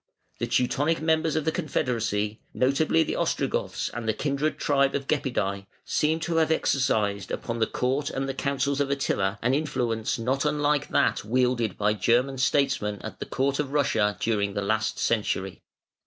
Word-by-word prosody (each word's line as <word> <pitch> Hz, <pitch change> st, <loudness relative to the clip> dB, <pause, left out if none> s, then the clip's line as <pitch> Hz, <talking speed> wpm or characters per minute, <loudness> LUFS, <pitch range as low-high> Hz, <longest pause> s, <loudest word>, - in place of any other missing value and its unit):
The 120 Hz, -, -1 dB
Teutonic 135 Hz, +6 st, +1 dB
members 160 Hz, 0 st, +1 dB
of 155 Hz, -2 st, 0 dB
the 160 Hz, -, +2 dB
confederacy, 115 Hz, -, -1 dB, 0.2 s
notably 145 Hz, +5 st, +3 dB
the -, -, -3 dB
Ostrogoths -, -, -1 dB
and 120 Hz, -1 st, -6 dB
the 110 Hz, -, +1 dB
kindred 145 Hz, +3 st, -1 dB
tribe 140 Hz, -1 st, +2 dB
of 140 Hz, -1 st, -2 dB
Gepidæ 100 Hz, -9 st, -1 dB, 0.2 s
seem 155 Hz, +2 st, +1 dB
to 165 Hz, +1 st, -1 dB
have 160 Hz, -1 st, +3 dB
exercised 105 Hz, -10 st, +1 dB
upon 115 Hz, -1 st, -4 dB
the 110 Hz, -, +2 dB
court 135 Hz, +3 st, -1 dB
and 135 Hz, 0 st, -3 dB
the 135 Hz, -, -2 dB
councils 140 Hz, +1 st, -1 dB
of 140 Hz, -, 0 dB
Attila 115 Hz, -7 st, 0 dB
an 125 Hz, +2 st, +2 dB
influence 125 Hz, -7 st, -1 dB
not 130 Hz, +4 st, 0 dB
unlike 150 Hz, -1 st, +1 dB
that -, -, +2 dB
wielded 125 Hz, 0 st, +1 dB
by 105 Hz, 0 st, +2 dB
German 125 Hz, +6 st, +1 dB
statesmen 115 Hz, -7 st, +1 dB
at -, -, -7 dB
the -, -, -5 dB
court 140 Hz, +2 st, 0 dB
of 145 Hz, -2 st, -2 dB
Russia 110 Hz, -8 st, +2 dB
during 100 Hz, -3 st, 0 dB
the 100 Hz, -, -1 dB
last 110 Hz, +2 st, 0 dB
century. 95 Hz, -4 st, -1 dB
130 Hz, 170 wpm, -26 LUFS, 110-145 Hz, 0.2 s, notably